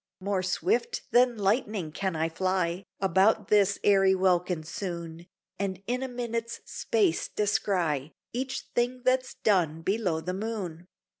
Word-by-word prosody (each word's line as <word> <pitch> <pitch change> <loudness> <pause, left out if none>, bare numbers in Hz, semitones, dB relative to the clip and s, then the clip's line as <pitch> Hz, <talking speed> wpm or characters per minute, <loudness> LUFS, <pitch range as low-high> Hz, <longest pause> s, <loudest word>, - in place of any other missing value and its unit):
More 195 0 -1
swift 420 - 0
than 245 -1 +4
lightning 205 -4 0
can 190 +2 -2
I 160 +1 +1
fly 185 +1 -1
About 195 +3 +3
this 200 -1 +4
airy 195 -1 +5
welkin 180 -3 +1
soon, 170 0 -6 0.3
And 195 -1 -3
in 250 +4 -1
a 265 - -2
minute's 235 -2 -4
space 410 -7 0
descry 175 -8 0 0.2
Each 265 +2 -2
thing 245 +1 0
that's 255 0 +1
done 165 -6 +1
below 190 -4 0
the 180 +3 -4
moon. 190 -5 -4
195 Hz, 135 wpm, -28 LUFS, 175-230 Hz, 0.3 s, airy